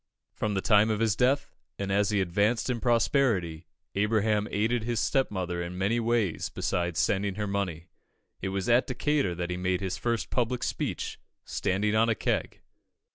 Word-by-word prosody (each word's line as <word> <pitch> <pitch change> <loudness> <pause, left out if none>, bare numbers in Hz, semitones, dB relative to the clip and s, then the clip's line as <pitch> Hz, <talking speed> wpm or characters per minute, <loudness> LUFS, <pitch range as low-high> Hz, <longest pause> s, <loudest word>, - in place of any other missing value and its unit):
From 105 -1 -2
the 95 - 0
time 105 0 +4
of 110 -1 0
his 110 -2 +2
death, 130 +5 +1 0.2
and 100 -1 -3
as 100 +1 +2
he 105 -2 +2
advanced 105 +8 +1
in 120 - -2
prosperity, 115 - +1 0.3
Abraham 105 0 +1
aided 110 +3 0
his 120 -1 -1
stepmother 95 -10 0
in 85 +1 -5
many 100 +5 +1
ways 115 -6 0
besides 85 -2 -1
sending 100 -1 +1
her 105 0 -2
money. 95 -5 -2 0.6
It 95 - -2
was 95 0 -2
at 120 +2 +4
Decatur 130 -6 0
that 90 +1 -3
he 90 - -2
made 90 0 0
his 95 -1 -3
first 115 -1 -1
public 125 0 0
speech, - - -3 0.3
standing 105 +3 0
on 115 +1 +4
a 115 - +2
keg. - - -2
105 Hz, 175 wpm, -28 LUFS, 95-115 Hz, 0.6 s, time